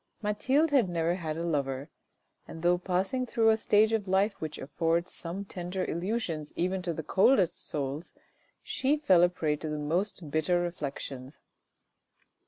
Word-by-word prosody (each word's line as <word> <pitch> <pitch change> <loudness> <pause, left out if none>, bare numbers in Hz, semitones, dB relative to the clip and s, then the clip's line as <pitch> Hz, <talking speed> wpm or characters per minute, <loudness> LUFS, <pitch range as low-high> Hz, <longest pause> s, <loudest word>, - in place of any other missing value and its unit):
Mathilde 260 +9 +2
had 255 -10 +4
never 170 0 +1
had 160 -4 -4
a 165 - -3
lover, 140 -2 -2 0.6
and 160 - -9
though 175 0 +3
passing 190 +8 -1
through 225 -1 +3
a - - +4
stage 220 0 +3
of 210 -3 0
life 195 +2 +1
which 155 -1 -4
affords 165 +5 -1
some 185 +3 -4
tender 180 0 -4
illusions 170 -4 -2
even 185 +2 0
to 180 -1 -2
the 160 -1 -4
coldest 190 - +3
souls, 145 +2 -3 0.5
she 280 +3 +1
fell 190 - +4
a 175 - +6
prey 155 -4 -1
to 155 - -5
the 150 - -2
most 165 +1 -2
bitter 160 +3 +2
reflections. 140 -5 -5
175 Hz, 160 wpm, -29 LUFS, 155-200 Hz, 0.6 s, a